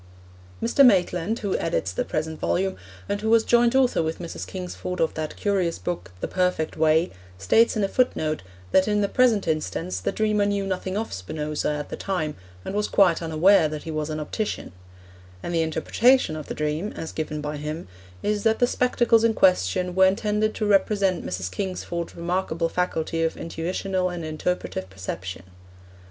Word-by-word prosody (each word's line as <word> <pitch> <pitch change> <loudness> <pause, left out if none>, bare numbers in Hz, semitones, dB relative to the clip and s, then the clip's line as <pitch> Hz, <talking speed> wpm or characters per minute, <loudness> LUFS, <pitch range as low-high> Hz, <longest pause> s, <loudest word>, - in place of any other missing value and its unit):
Mr. 235 +4 +4
Maitland, 190 -2 +3
who 200 -4 -2
edits 130 - -1
the 90 - -1
present 155 0 -3
volume, 190 +1 0 0.3
and 200 0 -2
who 220 - -1
was 225 0 +5
joint 240 +1 +3
author 255 -8 +3
with 160 0 -2
Mrs. 170 -2 -6
Kingsford 180 0 -5
of 165 - +1
that 155 -1 -4
curious 190 -5 0
book 90 0 -5
The - - -1
Perfect 180 -4 0
Way, 160 +2 +3 0.3
states 220 - +3
in 210 - +1
a - - +2
footnote 160 -10 0 0.3
that 190 - +4
in 210 0 +2
the 200 - +2
present 230 -5 +3
instance 95 - -2
the 95 - -1
dreamer 215 -1 +1
knew 200 -1 0
nothing 190 0 -2
of 220 +1 -3
Spinoza 150 +12 -3
at 150 -1 -3
the - - -4
time, 165 -6 -2 0.3
and - - -4
was 210 +1 0
quite 180 -5 +4
unaware 165 +2 +4
that 155 -1 -6
he 165 - -5
was 155 0 -2
an 155 0 -3
optician; 205 +8 -3 0.7
and 175 - -3
the 165 - +2
interpretation 160 +6 +2
of 155 -2 -7
the - - -5
dream, 155 +7 -2
as 160 - -5
given 155 -1 -4
by 150 0 -4
him, 150 +3 -5 0.4
is 210 0 0
that 220 +1 +2
the 245 - +4
spectacles 240 -2 +2
in 230 -1 +3
question 180 - +2
were 190 +1 +6
intended 210 +2 0
to 215 - -1
represent 200 -2 +2
Mrs. 90 0 -4
Kingsford's 180 - -4
remarkable 170 -1 -1
faculty 165 -2 -1
of 165 0 0
intuitional 180 +3 -2
and 175 -2 -5
interpretative 155 - -3
perception. 95 0 -6
180 Hz, 180 wpm, -24 LUFS, 155-205 Hz, 0.7 s, were